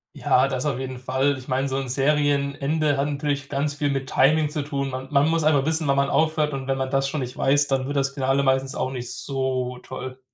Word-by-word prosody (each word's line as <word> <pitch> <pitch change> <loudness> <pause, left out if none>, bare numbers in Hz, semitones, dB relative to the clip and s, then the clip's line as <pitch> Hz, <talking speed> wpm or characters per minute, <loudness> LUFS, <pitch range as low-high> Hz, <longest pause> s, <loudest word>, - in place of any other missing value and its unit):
Ja, 130 +2 +3
das 130 +1 -2
auf 135 -4 -1
jeden 130 -1 -5
Fall. 130 +2 0
Ich 130 - -13
meine, 135 +1 0
so 135 - -2
'n 135 -2 -3
Serienende 145 +2 +1
hat 140 +1 +1
natürlich 145 -1 -2
ganz 145 +1 -1
viel 145 0 -1
mit 135 -1 -2
Timing 150 +4 +3
zu 150 0 -3
tun. 140 -2 -3
Man 130 +1 -5
man 145 0 +4
muss 165 0 +1
einfach 145 -3 +3
wissen, 160 -1 +2
wann 140 - +3
man 140 0 +1
aufhört 155 -2 +1
und 135 -1 -5
wenn 135 0 0
man 130 0 -2
das 135 0 +1
schon 150 0 -3
nicht 125 -1 -5
weiß, 145 +2 +3
dann 135 -1 0
wird 145 - -3
das 135 0 +1
Finale 135 0 +1
meistens 135 0 +1
auch 130 - -2
nicht 125 -2 -5
so 130 -2 -2
toll. 130 0 -8
140 Hz, 245 wpm, -24 LUFS, 130-145 Hz, -, man